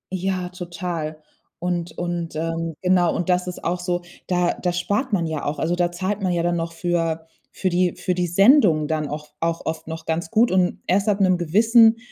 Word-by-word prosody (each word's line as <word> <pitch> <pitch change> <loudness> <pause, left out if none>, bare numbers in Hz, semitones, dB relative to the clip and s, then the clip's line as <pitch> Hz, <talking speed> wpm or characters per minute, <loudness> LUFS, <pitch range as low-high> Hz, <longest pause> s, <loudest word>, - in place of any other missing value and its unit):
Ja, 185 -1 -2
total. 170 -3 -5 0.4
Und 175 -1 -3
und 175 -2 -3
ähm, 165 0 -2
genau 180 -2 +3
und 175 - -2
das 180 0 +2
ist 180 - -6
auch 175 +1 -1
so, 175 0 -2 0.2
da 180 -1 +1
da 180 - +1
spart 205 +8 -1
man 175 -5 +1
ja 160 -2 -3
auch. 145 +1 -2
Also, 170 +2 0
da 175 -1 +1
zahlt 190 +4 -3
man 185 -2 0
ja 170 -1 0
dann 175 0 +1
noch 165 0 -3
für 165 -2 -1 0.3
für 185 - -1
die 180 0 +1
für 180 - -1
die 180 0 0
Sendung 185 - +5
dann 155 -2 -1
auch 150 +1 -6
auch 165 0 -2
oft 160 0 -4
noch 160 0 -6
ganz 165 +1 -2
gut. 230 +4 +3
Und 185 -1 +1
erst 195 +3 +2
ab 200 0 +1
'nem 185 -2 +4
gewissen, 225 +6 +5
175 Hz, 210 wpm, -22 LUFS, 165-185 Hz, 0.4 s, Sendung